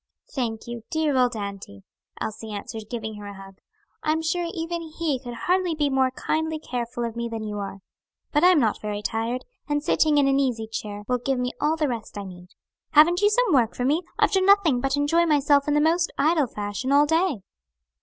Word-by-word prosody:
"Thank 230 -5 -3
you, 240 0 -5
you 230 - -13
dear 315 -4 0
old 250 -2 +3
auntie!" 200 - -7 0.4
Elsie 220 0 -5
answered, 210 +1 -7
giving 220 -3 -5
her 205 0 -8
a 200 - -8
hug. 195 0 -13 0.4
"I'm 315 +1 0
sure 340 +1 -1
even 335 0 -3
he 315 -4 -2
could 245 -2 -8
hardly 360 -2 +2
be 295 -2 0
more 265 -1 +3
kindly 315 +4 -2
careful 240 -4 -4
of 230 -1 -5
me 235 0 -3
than 225 -1 -5
you 210 -1 -4
are. 195 -1 -6 0.5
But 295 +2 +2
I - - +8
am 365 -4 +6
not 220 -5 +1
very 210 -1 -4
tired, 230 +3 -2 0.2
and 290 0 0
sitting 310 -2 +3
in 280 -1 +4
an 275 0 +3
easy 245 -5 0
chair 210 -2 -6
will 250 0 +1
give 270 +2 -1
me 250 0 -1
all 300 +2 +2
the 310 -2 0
rest 230 -4 -5
I 200 - -4
need. 180 -2 -11 0.5
Haven't 340 +5 +6
you 415 - +5
some 455 -3 +2
work 240 -4 +3
for 245 - -2
me? 300 +6 +2 0.2
I've - - +3
done 380 -2 +2
nothing 365 -11 +5
but 270 +1 0
enjoy 330 +4 +2
myself 285 -1 +3
in 295 - +2
the - - +4
most 330 +3 +2
idle 310 -3 +3
fashion 210 +5 -4
all 285 +1 +6
day." 320 - +1
270 Hz, 220 wpm, -24 LUFS, 225-315 Hz, 0.5 s, I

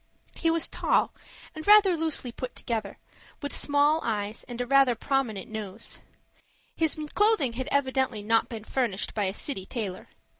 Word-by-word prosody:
He 330 - 0
was 330 0 +1
tall, - - +1 0.4
and 315 +2 -8
rather 415 -3 +7
loosely 315 -6 -1
put 250 +1 -6
together, 220 -4 -3 0.4
with 285 -1 -4
small 290 +2 +3
eyes 210 -1 -2
and 245 -1 -8
rather 275 -1 +5
a - - -9
prominent 230 -5 -1
nose. 220 -1 -5 0.7
His 320 -1 0 0.2
clothing 415 - +3
had 260 +2 -4
evidently 265 -5 +1
not 225 +2 +2
been 225 -3 -6
furnished 225 -5 -1
by 210 -2 0
a 190 - -1
city 210 -8 -3
tailor. 205 -7 -5
255 Hz, 155 wpm, -27 LUFS, 220-290 Hz, 0.7 s, rather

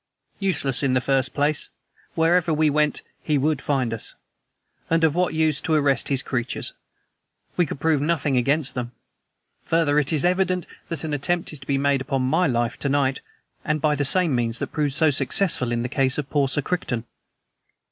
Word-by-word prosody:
"Useless, 165 -10 0
in 135 -2 +1
the - - +4
first 135 0 +1
place. 145 +1 0 0.5
Wherever 165 +1 +2
we 155 -1 +2
went, 150 0 0 0.2
HE 150 -2 0
would 145 0 0
find 130 -5 0
us. 115 - -8 0.7
And 165 0 +2
of 160 -3 +4
what 180 -1 0
use 155 -2 +1
to 160 - 0
arrest 140 -4 +2
his 135 -2 +1
creatures? 120 -2 -3 0.8
We 175 - +2
could 140 - -6
prove 155 -2 +1
nothing 150 -3 0
against 135 +3 +1
them. 125 -1 -5 0.7
Further, 160 -3 +2
it 145 +1 0
is 155 0 +1
evident 180 0 +1 0.2
that 165 -4 -2
an 155 -2 -3
attempt 165 +4 -1
is 150 - -5
to 135 - -14
be 140 - +1
made 140 -1 +1
upon 135 0 -1
my 160 +7 +2
life 120 -2 -1
to 140 - -1
night 135 -1 +1 0.4
and 150 0 -1
by 150 0 +2
the 145 -1 0
same 170 +2 +4
means 115 -2 -1
that - - -4
proved 145 -3 -1
so 160 -1 +4
successful 135 -1 +1
in 120 0 -1
the - - -1
case 135 0 +1
of 145 -2 -4
poor 145 -2 +2
Sir 140 +2 -1
Crichton." 130 -10 -2
145 Hz, 195 wpm, -23 LUFS, 135-160 Hz, 0.8 s, the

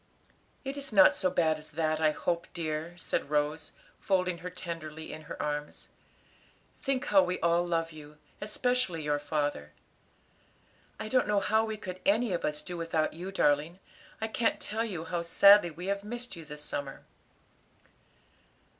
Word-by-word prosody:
'" - - -37
"It 270 +1 -4
is 275 -2 -2
not 195 -3 +7
so 185 - 0
bad 160 -3 +2
as 150 - -10
that, 155 0 0
I 155 -1 +4
hope, 170 +2 -1
dear," 160 0 -3
said 175 - -2
Rose, 150 +1 0 0.3
folding 185 -3 +1
her 180 +2 -5
tenderly 160 -3 -6
in 155 - -8
her - - -6
arms; 150 0 -4 0.9
"think 270 0 0
how 195 -6 +6
we 180 0 -1
all 170 +1 +3
love 165 -1 -1
you, 150 -1 -12 0.2
especially 215 -5 0
your 145 0 +1
father. 145 - -2 1.3
I - - -4
don't 255 +1 +2
know 210 -1 +3
how 220 +3 +2
we 220 -1 -4
could 185 -3 -7
any 215 +1 +2
of 175 - -2
us 150 0 -1
do 175 -1 -5
without 165 -2 0
you, 180 +4 -6
darling. 150 -1 +2 0.4
I 220 - -1
can't 225 +1 0
tell 220 +2 -2
you 180 -8 -4
how 175 0 -2
sadly 200 +3 +7
we 165 +3 -8
have 200 +1 -1
missed 240 +1 -6
you 165 -2 -10
this 150 0 -8
summer." 140 -2 -5
170 Hz, 170 wpm, -30 LUFS, 155-200 Hz, 1.3 s, not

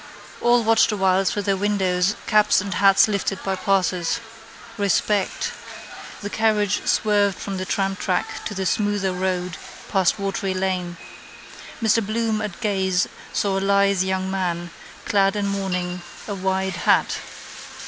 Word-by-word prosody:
All 240 0 +4
watched 225 0 +4
awhile 190 -2 +2
through 205 +2 0
their 195 0 +1
windows 190 -1 +1
caps 210 -1 +4
and 200 -1 -3
hats 195 +2 +5
lifted 200 -2 -1
by 195 -1 -1
passers. 185 -3 0 0.6
Respect. 200 -1 0 0.7
The 205 - -4
carriage 210 -2 +1
swerved 205 -3 +2
from 195 -1 -5
the 185 0 -4
tramtrack 195 +2 -1
to 210 - -4
the 190 0 -2
smoother 205 -1 0
road 180 -2 -2 0.3
past 190 -1 +2
Watery 195 -1 -2
lane. 185 -2 -2 0.9
Mr 225 +1 +3
Bloom 220 +1 -1
at 210 -5 -5
gaze 190 -4 +1 0.2
saw 195 -1 0
a - - -4
lithe 200 -1 +3
young 190 0 -1
man, 175 -3 -2 0.3
clad 195 -1 +2
in 205 -1 -1
mourning, 180 -3 -2 0.3
a 205 - -3
wide 190 -1 -1
hat. - - +2
195 Hz, 140 wpm, -22 LUFS, 185-205 Hz, 0.9 s, hats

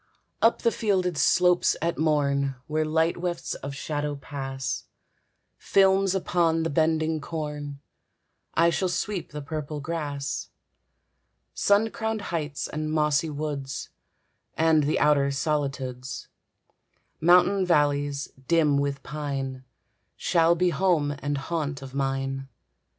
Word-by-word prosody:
Up 230 - +3
the 230 - +4
fielded 185 -6 0
slopes 180 +5 +4
at 170 +1 -1
morn, 140 -3 +1
Where 155 0 0
light 160 +2 +1
wefts 175 -1 -3
of 140 0 -6
shadow 145 +1 -3
pass, 135 -2 -4 0.7
Films 195 0 +3
upon 170 -3 +1
the 165 - -1
bending 160 +1 +1
corn, 150 -2 -5 0.8
I 170 +1 +4
shall 185 +2 0
sweep 185 +1 -2
the 150 -1 -6
purple 150 0 -4
grass. 145 -2 -3 1.0
Sun 205 +2 +3
crowned 220 -1 -2
heights 145 -5 -2
and 155 0 -3
mossy 150 0 +2
woods, 145 -2 -4 0.7
And 160 -2 +4
the 150 - +1
outer 145 -2 +4
solitudes, 135 -3 -2 0.9
Mountain 180 +3 +5
valleys, 145 -3 +2 0.2
dim 155 -4 +3
with 140 -1 -2
pine, 135 -3 -4 0.5
Shall 170 -1 +3
be 180 +1 +2
home 165 -3 +2
and 145 0 -2
haunt 145 -1 -3
of 130 -1 -9
mine. 135 0 -2
150 Hz, 115 wpm, -26 LUFS, 140-170 Hz, 1.0 s, Mountain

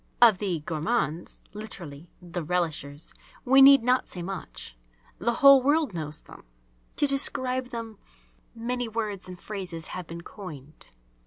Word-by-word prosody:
Of 225 -6 +7
the 185 -6 -2
"gourmands" 160 +1 -2
(literally 175 -7 -7
"the 175 -1 -5
relishers") 155 -3 -2 0.3
we 270 +2 +6
need 275 -2 +9
not 250 +1 +2
say 180 - -6
much. 185 - -6 0.4
The 225 +7 +1
whole 275 -1 +10
world 290 - +2
knows 155 -2 -5
them; - - -14 0.5
to - - +2
describe 260 -2 +1
them 230 -4 -7 0.6
many 245 +1 -2
words 215 -4 -4
and 180 -1 -8
phrases 180 -6 -6
have 180 -2 -6
been 170 0 -7
coined, 155 -7 -10
_e. - - -26
195 Hz, 145 wpm, -27 LUFS, 165-245 Hz, 0.6 s, whole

